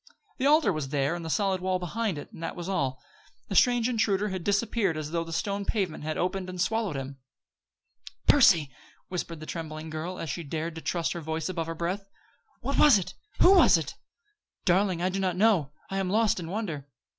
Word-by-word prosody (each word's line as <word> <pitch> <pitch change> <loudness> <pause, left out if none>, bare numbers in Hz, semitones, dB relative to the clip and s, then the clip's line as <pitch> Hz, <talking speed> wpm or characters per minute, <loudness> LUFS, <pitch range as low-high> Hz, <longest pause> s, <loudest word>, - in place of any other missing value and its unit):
The 265 - +2
altar 300 - +4
was 150 -4 -3
there 140 +2 0
and 175 -1 -5
the 165 - -5
solid 190 +1 +1
wall 185 0 +1
behind 185 +1 -2
it, 145 - -8
and - - -12
that 165 - -4
was 175 0 -6
all. 135 -9 -1 0.5
The - - -3
strange 245 -2 +4
intruder 210 -4 +1
had 185 -2 -4
disappeared 205 -3 +1
as 155 0 -5
though 170 0 0
the 165 - -9
stone 200 +4 -2
pavement 190 -8 -2
had 155 0 -3
opened 185 +1 -2
and 180 0 -7
swallowed 220 -3 0
him 135 -1 -4
up! 60 - -22 0.2
"Percy!" 150 -5 +6 0.4
whispered 170 -3 -4
the 155 - -8
trembling 155 -1 -6
girl, 160 +4 -4
as - - -6
soon - - -3
as 165 - -5
she 170 - -4
dared 160 +2 -4
to 160 - -8
trust 170 0 -1
her 170 - -5
voice 160 +1 -3
above 165 -3 -3
her 165 - -4
breath, 185 +4 -3 0.5
"What - - -1
was 290 -8 +8
it? 190 - -4 0.3
Who 375 - +8
was 380 - +7
it?" - - -4 0.7
"Darling, 185 -1 +2
I 185 - +2
do 190 +1 -2
not 185 -2 0
know. 185 -8 +3 0.2
I 195 - -1
am 190 -1 -1
lost 215 -1 +2
in 165 -2 -6
wonder." 170 -9 -4
175 Hz, 220 wpm, -28 LUFS, 160-200 Hz, 0.7 s, was